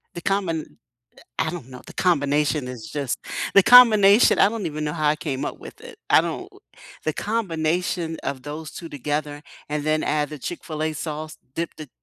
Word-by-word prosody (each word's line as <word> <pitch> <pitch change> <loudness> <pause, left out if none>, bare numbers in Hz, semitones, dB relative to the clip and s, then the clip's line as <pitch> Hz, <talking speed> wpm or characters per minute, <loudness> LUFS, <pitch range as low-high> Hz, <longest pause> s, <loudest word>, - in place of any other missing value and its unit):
The 175 - -6
combin 175 -5 -2 0.4
eh, - - -16 0.2
I 160 - +1
don't 160 -7 -8
know, 125 -1 -11
the - - -10
combination 145 -4 +1
is 120 -4 -8
just 140 -4 -2 0.4
the 200 - +8
combination. 215 -2 +7
I - - +6
don't 215 -4 -4
even 155 -1 -4
know 150 - -2
how 155 -2 0
I 150 - +2
came 140 -4 -3
up - - -5
with - - -12
it. - - -12
I - - +6
don't - - -4 0.6
the 155 - 0
combination 175 -4 -1
of 130 -2 -4
those 150 +2 -7
2 165 - -8
together 145 +1 -3 0.3
and 150 0 -2
then 155 0 +1
add 150 -1 0
the 150 - -7
Chick-fil-A 155 +1 -4
sauce, 155 +1 -5 0.2
dip 170 0 -2
the 155 -3 -9
155 Hz, 190 wpm, -23 LUFS, 150-175 Hz, 0.6 s, the